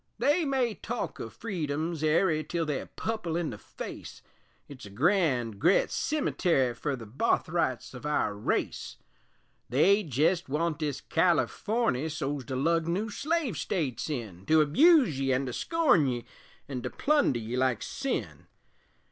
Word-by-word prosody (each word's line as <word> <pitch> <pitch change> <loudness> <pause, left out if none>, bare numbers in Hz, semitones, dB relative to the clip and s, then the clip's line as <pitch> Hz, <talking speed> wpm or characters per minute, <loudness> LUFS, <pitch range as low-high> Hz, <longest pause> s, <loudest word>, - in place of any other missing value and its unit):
They 305 +4 +2
may 260 -5 +1
talk - - -5
o' - - -5
Freedom's 160 -5 -3
airy 155 0 +2
Tell 165 +2 -2
they're 150 -3 -3
pupple 215 -7 -3
in 165 -5 -2
the 105 - -8
face - - -9 0.4
It's 130 -7 -10
a - - -11
grand 125 - +1
gret 175 +6 +3
cemetary 175 - +1
Fer 140 +4 -2
the 115 -3 -9
barthrights 140 - 0
of 125 - -9
our 150 -8 +1
race; 100 - -2 0.7
They 190 - +4
jest 165 - +1
want 155 +2 -1
this 145 -3 -2
Californy 175 - +1
So's 145 -3 -3
to 130 - -4
lug 165 +4 +1
new 200 +6 -1
slave 295 - -1
States 155 - -2
in 105 - -5
To 160 0 +5
abuse 250 - +5
ye, 135 -1 +1
an' 130 +2 0
to 125 - -4
scorn 310 - +3
ye, 120 -2 -2 0.4
An' 130 -3 -4
to 125 - -3
plunder 290 - +2
ye 115 +1 -4
like 130 -1 +1
sin. 275 -1 -4
155 Hz, 150 wpm, -29 LUFS, 130-195 Hz, 0.7 s, To